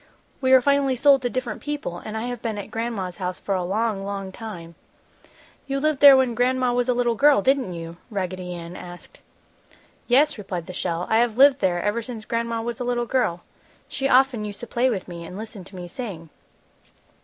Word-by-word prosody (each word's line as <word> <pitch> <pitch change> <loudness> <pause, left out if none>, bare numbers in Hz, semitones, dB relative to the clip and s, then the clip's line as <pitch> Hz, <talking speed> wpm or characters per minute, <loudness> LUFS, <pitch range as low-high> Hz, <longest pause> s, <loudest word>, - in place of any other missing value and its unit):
We 260 -1 +2
were 260 -1 +7
finally 280 -1 +2
sold 275 +1 +5
to 245 - -1
different 245 -3 -4
people 290 -12 -4
and 215 +3 -6
I 220 - -3
have 245 -1 -4
been 225 -3 -3
at 205 - -7
Gran'ma's 225 -6 -3
house 180 -1 -3
for 200 - -3
a 185 -1 0
long, 205 +2 -1
long 195 -1 -5
time." 185 -6 -8 0.9
"You 275 0 -1
lived 305 -1 0
there 280 -2 +9
when 260 -2 +2
Gran'ma 250 +1 +1
was 245 +1 0
a 250 - +3
little 240 -1 +2
girl, 280 -2 +4
didn't 265 -6 +2
you?" 165 0 -7
Raggedy 185 -3 -4
Ann 170 +1 -8
asked. 175 - -11 0.9
"Yes," 275 +1 +3
replied 180 -4 -5
the 185 - -8
shell, 175 -1 -2
"I 220 - +3
have 235 -1 +1
lived 275 0 +6
there 175 -5 0
ever 210 +3 0
since 225 -2 -8
Gran'ma 230 -1 -2
was 235 0 -4
a - - -2
little 240 -1 -1
girl. 225 -9 0 0.4
She 270 0 -2
often 255 -4 +4
used 205 -1 -7
to - - -5
play 240 +3 +1
with 200 -6 -3
me 170 -2 -8
and 180 +3 -9
listen 215 -3 -8
to 190 - -13
me 180 -1 -7
sing." 175 - -7
225 Hz, 210 wpm, -24 LUFS, 185-255 Hz, 0.9 s, there